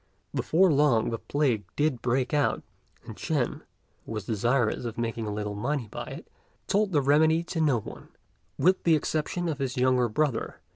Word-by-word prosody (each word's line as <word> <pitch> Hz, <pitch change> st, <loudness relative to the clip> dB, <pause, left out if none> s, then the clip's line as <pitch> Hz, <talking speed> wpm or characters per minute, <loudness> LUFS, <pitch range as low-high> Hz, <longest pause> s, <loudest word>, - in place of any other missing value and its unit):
Before 180 Hz, +2 st, +3 dB
long 135 Hz, -6 st, +3 dB
the 115 Hz, -, -3 dB
plague 135 Hz, -8 st, 0 dB
did 145 Hz, -5 st, 0 dB
break 125 Hz, +3 st, 0 dB
out; 145 Hz, -1 st, +1 dB, 0.4 s
and -, -, -8 dB
Ch'ên, -, -, -2 dB, 0.4 s
who -, -, -10 dB
was 105 Hz, -3 st, -4 dB
desirous 120 Hz, +2 st, +1 dB
of 115 Hz, -2 st, -5 dB
making 115 Hz, -1 st, -2 dB
a -, -, -2 dB
little 105 Hz, 0 st, -3 dB
money 120 Hz, +4 st, -2 dB
by -, -, -5 dB
it, -, -, -9 dB, 0.4 s
told 205 Hz, 0 st, +1 dB
the 150 Hz, -4 st, +3 dB
remedy 155 Hz, +4 st, +4 dB
to 170 Hz, -1 st, -3 dB
no 140 Hz, -7 st, +3 dB
one, -, -, -10 dB, 0.5 s
with 185 Hz, +2 st, +3 dB
the 165 Hz, -2 st, +5 dB
exception 155 Hz, +3 st, -1 dB
of 155 Hz, -3 st, -2 dB
his 135 Hz, -1 st, -3 dB
younger 125 Hz, -1 st, +3 dB
brother. 135 Hz, 0 st, -1 dB
135 Hz, 180 wpm, -27 LUFS, 115-155 Hz, 0.5 s, the